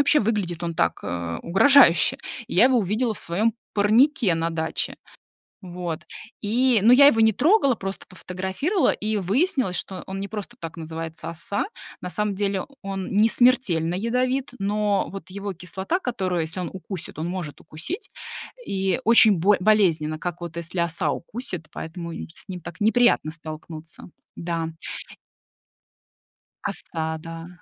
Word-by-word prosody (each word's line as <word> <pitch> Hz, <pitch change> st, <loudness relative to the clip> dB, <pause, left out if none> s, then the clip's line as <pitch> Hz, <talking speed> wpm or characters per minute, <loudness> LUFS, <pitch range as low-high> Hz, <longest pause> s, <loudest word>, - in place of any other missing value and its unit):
вообще 295 Hz, +1 st, +4 dB
выглядит 200 Hz, -6 st, -1 dB
он 170 Hz, -1 st, -2 dB
так, 85 Hz, -, +1 dB
э, 85 Hz, -1 st, -3 dB
угрожающе. 195 Hz, -, +6 dB, 0.3 s
И -, -, -6 dB
я 195 Hz, -, +7 dB
его 255 Hz, -2 st, +5 dB
увидела 220 Hz, +4 st, 0 dB
в -, -, -6 dB
своём 210 Hz, +7 st, 0 dB, 0.2 s
парнике 220 Hz, -, +4 dB
на 165 Hz, 0 st, 0 dB
даче. 160 Hz, -1 st, -2 dB, 0.7 s
Вот 175 Hz, -3 st, -5 dB, 0.4 s
и 240 Hz, +3 st, +3 dB
но 235 Hz, +3 st, +7 dB
я 280 Hz, +2 st, +9 dB
его 225 Hz, -5 st, +5 dB
не 220 Hz, 0 st, +6 dB
трогала, 290 Hz, -, +4 dB
просто 195 Hz, -2 st, -5 dB
пофотографировала, 190 Hz, -, -1 dB
и 215 Hz, 0 st, -2 dB
выяснилось, 245 Hz, -, +1 dB
что 185 Hz, 0 st, -3 dB
он 190 Hz, 0 st, -5 dB
не 200 Hz, -, -4 dB
просто 215 Hz, +4 st, -7 dB
так 165 Hz, 0 st, -7 dB
называется 160 Hz, 0 st, -6 dB
"оса". 170 Hz, +5 st, -2 dB, 0.4 s
На 180 Hz, -, -4 dB
самом 205 Hz, +2 st, -1 dB
деле 195 Hz, -1 st, -1 dB, 0.2 s
он 195 Hz, -1 st, -4 dB
не 210 Hz, +3 st, +4 dB
смертельно 190 Hz, -10 st, +3 dB
ядовит, 250 Hz, +5 st, 0 dB
но 205 Hz, 0 st, 0 dB
вот 195 Hz, 0 st, -8 dB
его 200 Hz, 0 st, -5 dB
кислота, 190 Hz, -, -3 dB
которую 190 Hz, -, -1 dB
если 160 Hz, +3 st, -4 dB
он 175 Hz, -, -3 dB
укусит, 190 Hz, -2 st, -7 dB
он 160 Hz, +2 st, -3 dB
может 175 Hz, -5 st, -5 dB
укусить, 160 Hz, -, -6 dB, 0.5 s
и 190 Hz, -2 st, 0 dB
очень 220 Hz, -4 st, +7 dB
боль 200 Hz, +4 st, +4 dB
болезненно, 170 Hz, -7 st, +3 dB
как 175 Hz, 0 st, -4 dB
вот 170 Hz, -2 st, -6 dB
если 170 Hz, +2 st, -4 dB
оса 170 Hz, -1 st, +1 dB
укусит, 185 Hz, -4 st, -5 dB
поэтому 170 Hz, +1 st, -6 dB
и -, -, -6 dB
с -, -, -12 dB
ним 180 Hz, -2 st, -6 dB
так 170 Hz, +3 st, -9 dB
неприятно 220 Hz, -6 st, +3 dB
столкнуться. 155 Hz, +1 st, -8 dB, 0.3 s
Да. 170 Hz, -1 st, -2 dB, 2.0 s
Оса, 160 Hz, -1 st, 0 dB
да, 165 Hz, +1 st, -8 dB
190 Hz, 150 wpm, -24 LUFS, 170-220 Hz, 2.0 s, я